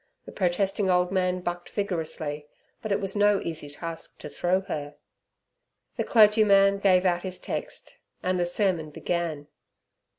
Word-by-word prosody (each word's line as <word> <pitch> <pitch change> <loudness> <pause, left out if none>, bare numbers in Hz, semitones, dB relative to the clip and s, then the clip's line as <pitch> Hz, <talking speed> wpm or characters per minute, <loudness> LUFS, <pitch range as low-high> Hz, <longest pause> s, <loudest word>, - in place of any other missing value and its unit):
The - - -9
protesting 190 +1 0
old 180 0 +2
man 185 -1 0
bucked 175 0 -4
vigorously, 160 -6 -4 0.3
but 215 - -5
it 200 - +2
was 195 0 -3
no 205 -1 +4
easy 160 -3 -5
task 165 +3 -8
to - - -8
throw 180 +5 0
her. 150 -7 -5 1.0
The - - -1
clergyman 210 -3 +5
gave 185 -2 +4
out 175 -1 +2
his 185 -1 -4
text, - - -6 0.3
and 185 0 0
the 175 - +1
sermon 175 -4 0
began. 160 -1 -3
180 Hz, 145 wpm, -26 LUFS, 170-195 Hz, 1.0 s, clergyman